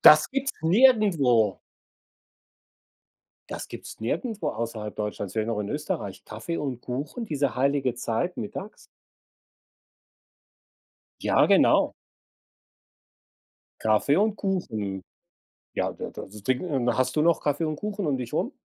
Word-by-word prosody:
Das 155 0 +8
gibt's 275 0 -1
nirgendwo. 165 - +4 1.9
Das - - -5
gibt's - - -9
nirgendwo 200 - -2
außerhalb 110 -2 -4
Deutschlands, 105 -2 -4
vielleicht 110 -1 -1
noch 115 -2 -1
in 100 - -3
Österreich, 150 - -3
Kaffee 115 +10 -5
und 130 -4 -3
Kuchen, 145 - -4
diese 140 - -1
heilige 135 -1 +1
Zeit, 120 +9 -2
mittags. 105 - -6 2.4
Ja, - - +4
genau. - - +5 1.9
Kaffee 110 +7 +3
und 210 +1 +2
Kuchen. 110 - -2 0.7
Ja, - - -1
da - - -6
das 105 +1 -9
Ding, 130 +2 +1
ähm 130 -5 0
hast 130 0 +1
du 150 - +3
noch 170 0 +3
Kaffee 145 +2 0
und 155 -1 -2
Kuchen 205 0 -3
um 140 -3 +1
dich 125 -2 -6
rum - - 0
135 Hz, 120 wpm, -26 LUFS, 110-170 Hz, 2.4 s, Das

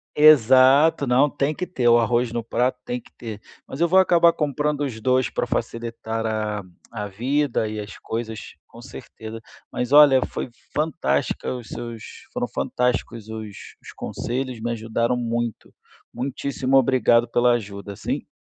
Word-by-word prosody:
exato 140 +1 +6
não, 130 +4 +3
tem 145 +2 -1
que 180 - -4
ter, 125 -10 0
o 120 0 +6
arroz 120 +1 +1
no 120 -1 -3
prato 125 +3 0
tem 245 0 -3
que 245 - -21
ter, 110 -3 -7 0.3
mas 135 - -8
eu 170 - +3
vou 185 +3 +5
acabar 170 -2 +5
comprando 150 0 -1
os 120 -6 -4
2 130 +2 +1
para - - -2
facilitar 115 -1 -3
a 105 -2 -2 0.3
a 105 -2 -4
vida 125 +4 0
e 105 0 -4
as 105 0 -9
coisas 110 -1 -5 0.3
com 115 - -14
certeza. 115 -3 -9 0.3
Mas 125 +2 -3
olha, 145 -3 +8
foi - - -5 0.2
fantástica 140 - -1
os 120 -3 -8
seus 120 -2 -7 0.3
foram - - -1
fantásticos 120 -3 -2
os 110 -2 -7 0.3
os - - -11
conselhos, 125 -1 -4
me 120 +1 -2
ajudaram 115 +2 -1
muito, 120 -1 -3 0.4
muitíssimo 135 +1 -1
obrigado 125 -2 +4
pela 120 +1 +3
ajuda, 100 -3 -4
sim? - - -4
120 Hz, 155 wpm, -23 LUFS, 115-135 Hz, 0.4 s, olha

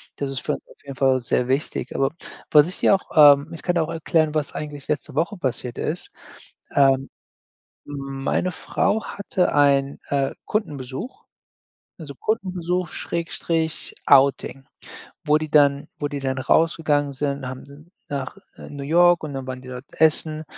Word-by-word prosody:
Das 140 - -3
ist 135 - -3
für 150 - -2
uns - - -6
auf - - -19
jeden 140 -1 -8
Fall 130 -1 +3
sehr 125 +1 -1
wichtig. 135 +3 -2
Aber 135 0 +1 0.4
was 150 +2 +6
ich 185 - -5
dir - - +5
auch, 190 - -6 0.3
ähm 140 +4 -10
ich 165 - -8
kann 175 -1 0
auch 160 -1 0
erklären, 160 -1 +1
was 150 -2 -2
eigentlich 145 -2 -7
letzte 150 - -3
Woche 170 +6 0
passiert 125 -5 -3
ist. 170 +4 -3 0.6
Ähm, 135 -1 +3 0.8
meine 135 +4 -2
Frau 205 +6 0
hatte 190 -2 -1
einen, 140 -1 +3
äh, 140 -1 0
Kundenbesuch, 210 - -4 0.7
also, 140 -3 -9
Kundenbesuch 180 - -2
Schrägstrich 165 -1 -3
Outing, 135 0 +4 0.6
wo 150 +1 +4
die 155 -1 -5
dann 145 -2 +4
wo 145 - -2
die 145 -1 -5
dann 130 -1 -2
rausgegangen 145 0 +2
sind, 140 -1 -3
haben 140 +5 -11 0.2
nach 135 -2 -4 0.2
New 145 -1 -8
York 175 +3 +4
und 155 -2 -5
dann 135 -1 -5
waren 130 0 -6
die 130 - -12
dort 125 +1 -8
essen. 155 0 +1
145 Hz, 155 wpm, -23 LUFS, 135-165 Hz, 0.8 s, was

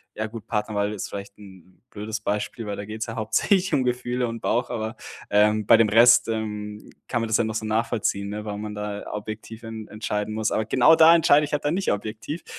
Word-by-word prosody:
ja 110 +1 -3
gut, 115 0 -9
Partnerwahl 105 -1 -1
ist 100 - -5
vielleicht 100 +1 -8
'n 95 -2 -16
blödes 105 +1 -5
Beispiel, 105 +2 -3
weil 100 - -3
da 100 - -6
geht 110 +1 -8
es - - -2
ja 115 - -6
hauptsächlich 160 - +1
um 135 -3 +3
Gefühle 125 0 -1
und 115 0 -6
Bauch, 120 +2 0
aber, 110 -2 -4 0.4
ähm, 105 0 +3
bei 115 - +7
dem 110 -2 +3
Rest, 120 +2 +6
ähm, 105 -1 -5 0.2
kann 120 -2 -1
man 115 - -2
das 110 - +3
ja 120 - +1
noch 110 0 -3
so 110 - -2
nachvollziehen, 110 -2 -1
ne, 105 +1 -5
wenn 105 0 -5
man 105 -1 -6
da 105 0 -4
ja - - -8
objektiv 110 +2 -7
en 110 -1 -7
entscheiden 105 0 -3
muss. 110 0 -1
Aber 110 - 0
genau 130 +8 +5
da 165 +1 +7
entscheide 150 -2 +5
ich - - -9
halt 145 - -1
da 145 - +2
nicht 190 +2 0
objektiv 110 - -5
110 Hz, 235 wpm, -24 LUFS, 105-120 Hz, 0.4 s, bei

